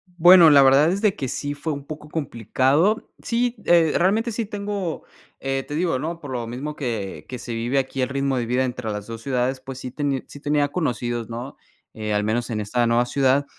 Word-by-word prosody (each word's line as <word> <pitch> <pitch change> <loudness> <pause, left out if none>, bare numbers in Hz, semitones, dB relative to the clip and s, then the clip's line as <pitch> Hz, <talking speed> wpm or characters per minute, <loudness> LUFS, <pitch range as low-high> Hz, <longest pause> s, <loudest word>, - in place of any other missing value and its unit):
Bueno, 175 -1 +8
la 145 -2 +7
verdad 135 +4 +6
es 195 +2 -2
de 210 -3 +2
que 135 - -3
sí 145 +3 -3
fue 150 +2 -3
un 140 -1 -7
poco 150 0 -8
complicado. 140 - +1
Sí, 240 +1 0
eh, 170 -2 +5
realmente 215 +6 +2
sí 225 +1 -2
tengo, 200 -4 -4 0.4
eh, 135 0 -1
te 145 - -5
digo, 165 -4 0
¿no? 165 +4 -4
Por 145 - -8
lo 120 -2 -3
mismo 135 +6 -5
que 105 - -4
que 125 - -6
se 120 0 -6
vive 120 +4 -1
aquí, 135 0 -1
el 130 - 0
ritmo 140 -1 0
de 120 - -1
vida 125 +3 +1
entre 125 -3 -3
las 105 -1 -4
2 115 -1 -7
ciudades, 130 0 -1
pues 130 0 -8
sí 125 - -6
tení 140 -1 -2
sí 145 - -11
tenía 145 0 +1
conocidos, 120 -8 -2
¿no? 120 +4 -7 0.4
Eh, 110 -1 -3
al 105 0 +1
menos 115 +4 -1
en 110 -2 -2
esta 120 +3 0
nueva 120 +1 +3
ciudad, 135 +2 +2
135 Hz, 220 wpm, -23 LUFS, 120-160 Hz, 0.4 s, Bueno